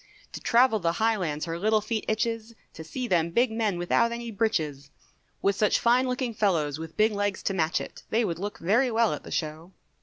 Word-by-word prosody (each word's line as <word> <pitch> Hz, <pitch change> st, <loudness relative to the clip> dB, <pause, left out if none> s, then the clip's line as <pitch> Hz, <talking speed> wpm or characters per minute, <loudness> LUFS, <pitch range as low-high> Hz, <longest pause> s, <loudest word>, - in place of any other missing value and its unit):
To -, -, -7 dB
travel 235 Hz, -2 st, +4 dB
the 170 Hz, -2 st, 0 dB
highlands 185 Hz, -9 st, 0 dB
her 165 Hz, 0 st, -4 dB
little 215 Hz, +3 st, +3 dB
feet 215 Hz, +1 st, -3 dB
itches, 225 Hz, +1 st, -2 dB, 0.2 s
To 160 Hz, -, -9 dB
see 250 Hz, +10 st, -4 dB
them 170 Hz, -5 st, +2 dB
big 235 Hz, +7 st, +2 dB
men 220 Hz, -4 st, 0 dB
without 230 Hz, +7 st, +2 dB
any 235 Hz, 0 st, -5 dB
breeches, 155 Hz, -10 st, -1 dB, 0.5 s
With 200 Hz, 0 st, +3 dB
such 210 Hz, 0 st, +3 dB
fine 245 Hz, +2 st, +3 dB
looking 250 Hz, -1 st, -2 dB
fellows 160 Hz, -9 st, 0 dB
with 160 Hz, 0 st, -8 dB
big 215 Hz, +1 st, +4 dB
legs 205 Hz, -1 st, -2 dB
to 195 Hz, -, 0 dB
match 165 Hz, -2 st, +1 dB
it, -, -, -8 dB
They 230 Hz, +1 st, +2 dB
would 170 Hz, -4 st, -3 dB
look 205 Hz, +2 st, -4 dB
very 230 Hz, +9 st, +2 dB
well 230 Hz, -1 st, +2 dB
at -, -, -5 dB
the -, -, -11 dB
show. 160 Hz, +3 st, -4 dB
210 Hz, 210 wpm, -27 LUFS, 170-230 Hz, 0.5 s, travel